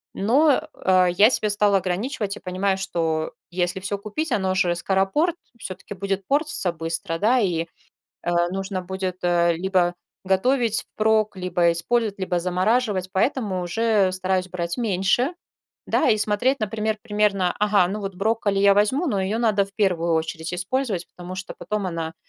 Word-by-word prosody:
Но, 270 +8 +3
э, 185 -1 +3
я 210 +5 +7
себя 215 -4 0
стала 205 -1 +3
ограничивать 200 +3 -2
и - - -10
понимаю, 190 +1 -1
что 160 -4 -2 0.2
если 180 +1 -1
всё 195 +2 -3
купить, 255 +9 -4
оно 190 -4 +1
же 175 -2 +2
скоропорт, 195 - +1 0.2
всё-таки 190 +1 -7
будет 195 0 -3
портиться 285 - 0
быстро, 165 0 -3
да, 240 +6 +3
и, 170 -5 0 0.6
э, 175 - 0 0.2
нужно 190 0 -3
будет 185 0 -4
либо 175 +1 +2 0.3
готовить 225 +4 +2
впрок, 215 -1 +1
либо 180 -2 +1
использовать, 205 +5 0
либо 180 -2 -1
замораживать, 185 +2 0
поэтому 195 -3 0
уже 210 +1 +2
стараюсь 185 0 -1
брать 170 -1 -3
меньше, 225 - +1 0.6
да. - - +2
И 215 - +2
смотреть, 225 +6 +1
например, 215 0 -2
примерно, 205 -5 +1
ага, 205 -4 +3
ну, 210 +3 -4
вот 195 -1 -5
брокколи 205 0 0
я 200 0 +5
возьму, 260 - +2
но 205 -8 0
её 210 +4 -1
надо 210 -4 +2
в 195 - -18
первую 180 -6 +1
очередь 160 +1 -2
использовать, 190 0 -2
потому 180 +1 -7
что 190 +1 -7
потом 210 -3 -3
она, 165 -2 -4
195 Hz, 155 wpm, -23 LUFS, 180-215 Hz, 0.6 s, я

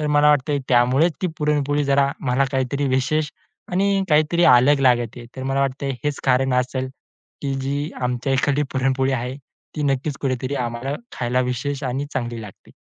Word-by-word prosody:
तर 150 - -1
मला 150 0 +4
वाटतंय, 145 0 +1
त्यामुळेच 130 +7 +4
ती 185 - +2
पुरणपोळी 145 -1 +1
जरा 140 0 +3
मला 130 +1 +1
काहीतरी 135 +2 0
विशेष 140 +4 0 0.4
आणि 195 +1 +2
काहीतरी 155 +3 +3
अलग 135 +2 +6
लागते. 120 -2 +1
तर 130 - -5
मला 135 +1 0
वाटतंय 135 0 -1
हेच 145 -1 -1
कारण 130 0 +2
असेल, 130 +1 -1 0.5
की 140 -1 -1
जी 140 +3 -2
आमच्या 125 +2 -1
इकडची 145 +2 +1
पुरणपोळी 135 0 +1
आहे, 125 +1 -3 0.4
ती 150 - -3
नक्कीच 140 +1 -1
कुठेतरी 130 0 -2
आम्हाला 120 +4 -4 0.2
खायला 125 +1 +1
विशेष 140 +3 -3
आणि 135 +3 -2
चांगली 120 -2 -3
लागते. 105 -3 -13
135 Hz, 165 wpm, -22 LUFS, 125-145 Hz, 0.5 s, अलग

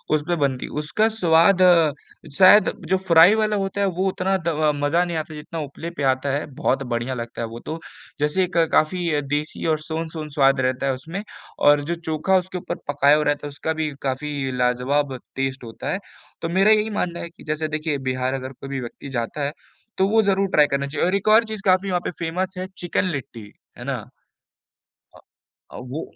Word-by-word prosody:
उसपे 155 +3 -1
बनती 140 -4 -1
है। - - -10
उसका 150 +9 +1
स्वाद, 180 -3 +4 0.8
शायद 195 +3 +7 0.2
जो 190 - +3
फ्राई 170 +5 +7
वाला 215 -1 +1
होता 195 0 -2
है 200 - +3
वो 185 +1 -1
उतना 190 +1 0
द 155 -2 +2
मज़ा 145 +4 +2
नहीं 170 -2 -3
आता 155 0 -5
जितना 155 +2 -7
उपले 150 +3 -6
पे 145 - -2
आता 130 +2 -4
है, 145 - -4
बहुत 135 +1 0
बढ़िया 120 +1 -2
लगता 120 -1 -6
है 115 - -2
वो 115 +1 -8
तो, 160 +6 -6 0.4
जैसे 150 +6 +1
एक 180 -1 -3
काफ़ी 160 -1 +2
देसी 145 +2 -3
और 155 -1 +2
सोन-सोन 160 0 -5
स्वाद 135 -1 +3
रहता 130 +1 0
है 135 - +1
उसमें। 165 +10 -6 0.4
और 145 0 +5
जो 170 - -1
चोखा 165 +3 +1
उसके 185 0 -3
ऊपर 180 - -4
पकाया 145 0 +4
हुआ 150 - +1
रहता 145 0 0
है, - - -6
उसका 160 +3 -3
भी 155 -1 -2
काफ़ी 135 0 -2
लाजवाब 130 +3 +1 0.2
टेस्ट 135 -1 -2
होता 115 +4 -7
है। 195 - -2 0.4
तो 165 - -2
मेरा 195 +5 +4
यही 215 0 +3
मानना 180 -5 -2
है 170 - -6
कि 170 - -17
जैसे 155 +1 -2
देखिए, 155 -1 -2
बिहार 130 -1 -2
अगर 130 0 -4
कोई 135 +1 -10
भी 135 - -3
व्यक्ति 120 +3 -8
जाता 125 +3 -3
है, 140 - -1 0.5
तो 190 - +3
वो 220 +1 +4
ज़रूर 195 -1 +2
ट्राई 150 -1 +5
करना 140 0 0
चाहिए। 145 +4 -1
और 185 - +1
एक 200 +2 -2
और 220 +2 +6
चीज़ 220 -2 -6
काफ़ी 185 +1 +3
वहाँ 180 -1 0
पे - - -1
फेमस 180 +3 -2
है 185 - -3
चिकन 175 +1 -1
लिट्टी, 115 -7 -7 0.3
है - - -8
ना? - - -4 1.1
अ - - -15 0.5
अ, - - -9
वो 155 - -3
155 Hz, 210 wpm, -22 LUFS, 140-180 Hz, 1.1 s, शायद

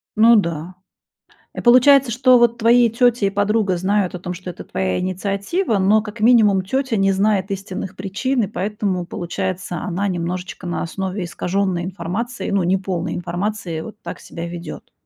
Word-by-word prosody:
Ну 230 +2 +6
да. 170 -3 -1 0.8
И - - -4
получается, 255 +2 +6
что 250 +1 +5
вот 235 0 +3
твои 235 +1 +4
тётя 240 -2 +2
и - - +1
подруга 205 -1 +1
знают 190 0 0
о - - -6
том, 180 0 -5
что 185 +1 -8
это 175 - -8
твоя 95 -1 -2
инициатива, 200 - -1
но 200 +3 +3
как 210 0 -9
минимум 215 -4 +4
тётя 260 +2 -1
не 195 0 +3
знает 195 0 +1
истинных 195 -1 -5
причин 200 +8 -1
и - - -1
поэтому, 195 -2 -2
получается, 180 +1 -4
она 185 +5 -2
немножечко 180 +1 -4
на 175 - -3
основе 190 +2 -4
искаженной 180 +1 -1
информации, 190 +7 -4
ну, 200 -2 +1
неполной 185 -1 -1
информации, 175 -1 -3
вот 215 +3 -10
так - - -7
себя 170 +1 -7
ведёт. 170 0 -8
195 Hz, 165 wpm, -20 LUFS, 180-220 Hz, 0.8 s, Ну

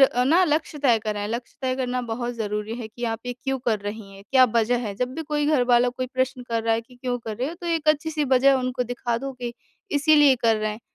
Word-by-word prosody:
अ, 260 -2 +4
ना 330 +7 +4
लक्ष्य 305 -1 -1
तय 250 -6 +4
करें। 210 -1 -3
लक्ष्य 235 +2 -5
तय 255 0 0
करना 250 -1 -1
बहुत 240 +1 -3
ज़रूरी 210 0 -3
है 235 -3 -6
कि 240 +2 -7
आप 225 -1 -2
ये 245 - -2
क्यों 265 +2 -3
कर 230 -3 0
रही 205 0 -7
हैं? 195 0 -13
क्या 260 -1 +7
वजह 235 +1 +3
है? 200 - -4
जब 250 +3 -2
भी 320 - -4
कोई 295 -1 -1
घर 295 -5 +3
वाला 240 +1 +5
कोई 255 +1 -4
प्रश्न 260 0 -2
कर 230 -1 -1
रहा 225 0 +2
है 225 - -1
कि 240 +2 -19
क्यों 245 0 -2
कर 220 -3 -6
रहे 255 +4 -2
हो 335 - -6
तो 345 - -6
एक 325 -2 0
अच्छी 305 +1 +2
सी 300 -1 -1
वजह 270 +2 +6
उनको 255 0 -1
दिखा 240 0 -2
दो 270 +2 -5
कि 245 -1 -6 0.5
इसीलिए 295 -3 +6
कर 230 -2 +2
रहे 215 0 -1
हैं। 215 - -7
245 Hz, 270 wpm, -24 LUFS, 230-270 Hz, 0.5 s, क्या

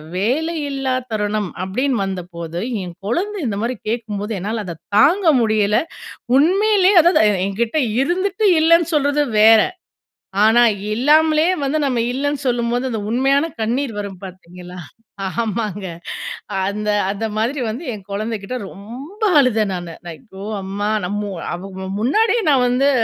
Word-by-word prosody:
வேலையில்லா 275 - -1 0.2
தருணம், 210 -2 -1
அப்படின்னு 250 +7 -1
வந்தபோது, 175 -3 -5 0.2
என் 175 -1 -8
குழந்தை 395 - -1
இந்த 200 -2 -2
மாரி 245 +2 -1
கேட்கும்போது 215 -2 -3
என்னால 215 +4 -3
அத 170 -3 -7 0.2
தாங்க 355 - +4 0.2
முடியல. 215 -2 +2 0.6
உண்மையிலயே 390 +5 +4
அதாவது, 345 -3 +4
எ - - +3 0.2
எங்கிட்டே 235 +9 -1 0.2
இருந்துட்டு 375 +7 0
இல்லன்னு 335 +1 +4
சொல்றது 290 0 +2 0.2
வேற, 220 0 +7 0.8
ஆனா 230 +2 +5 0.3
இல்லாமலயே 310 +6 +4
வந்து 280 +3 0
நம்ம 250 -3 0
இல்லன்னு 285 +2 -2
சொல்லும்போது 240 +1 0
அந்த 225 -3 -3
உண்மையான 270 +5 +2 0.2
கண்ணீர் 240 +3 -1
வரும் 200 -3 -6
பார்த்தீங்களா! 180 -1 -11 0.5
ஆமாங்க. 210 -2 -3 0.8
அந்த 210 +1 -3 0.2
அந்த 205 +3 -4
மாதிரி 250 +6 -1
வந்து 245 +10 -5
என் 200 -3 -9
குழந்தைகிட்ட 215 +2 -4
ரொம்ப 260 - -11 0.2
அழுதேன் 220 -7 +2
நானு. 175 -2 -6
ஐயோ! 190 +3 -10 0.2
அம்மா 200 +2 -3 0.2
நம்ம 205 +1 -3 0.2
அவ 175 - -6 0.2
வ 190 - -5
முன்னாடியே 440 - +2
நான் 265 -3 +4
வந்து 260 +3 +2
230 Hz, 130 wpm, -19 LUFS, 200-285 Hz, 0.8 s, வேற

